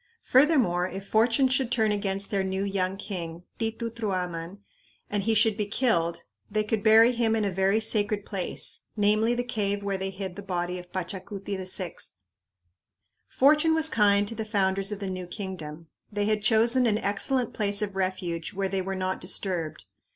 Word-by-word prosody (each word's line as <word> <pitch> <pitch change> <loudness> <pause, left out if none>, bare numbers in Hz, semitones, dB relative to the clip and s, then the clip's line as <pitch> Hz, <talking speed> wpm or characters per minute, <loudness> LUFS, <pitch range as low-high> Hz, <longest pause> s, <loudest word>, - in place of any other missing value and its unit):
Furthermore, 250 - +3
if 195 +2 -8
fortune 230 +4 +3
should 255 -1 0
turn 220 -4 +2
against 200 -1 -1
their 195 -2 +1
new 190 +1 -2
young 195 -1 -1
king, 175 -4 -6 0.2
Titi 225 +1 -2
Truaman, 185 -5 -3 0.5
and 205 -1 0
he 220 +3 +1
should 220 0 +4
be 210 -1 -2
killed, 170 -7 0 0.3
they 215 +1 0
could 215 0 -1
bury 225 +2 +6
him 230 -2 +1
in 215 -2 0
a 200 - 0
very 195 +3 +2
sacred 210 -2 +1
place, 195 -4 -3
namely, 215 +3 +3
the 245 - -1
cave 205 -4 -1
where 200 -1 -2
they 190 0 -2
hid 190 -1 -6
the 200 - -7
body 180 -2 -3
of 180 0 -13
Pachacuti 190 +2 -5
VI. 185 -2 -1 1.3
Fortune 300 +4 +4
was 320 0 +4
kind 205 -2 +3
to 230 - -2
the 220 0 -4
founders 195 -2 +1
of 205 - -4
the 200 - -4
new 185 -1 -5
kingdom. 175 -5 -7 0.3
They 205 0 -1
had 215 0 +1
chosen 235 +4 +4
an 210 -2 +2
excellent 230 +5 -1
place 205 -1 0
of 200 -2 -4
refuge 185 -3 -3
where 195 0 -1
they 195 0 -1
were 195 +1 -3
not 185 0 -2
disturbed. 175 -4 -2
200 Hz, 180 wpm, -27 LUFS, 185-220 Hz, 1.3 s, bury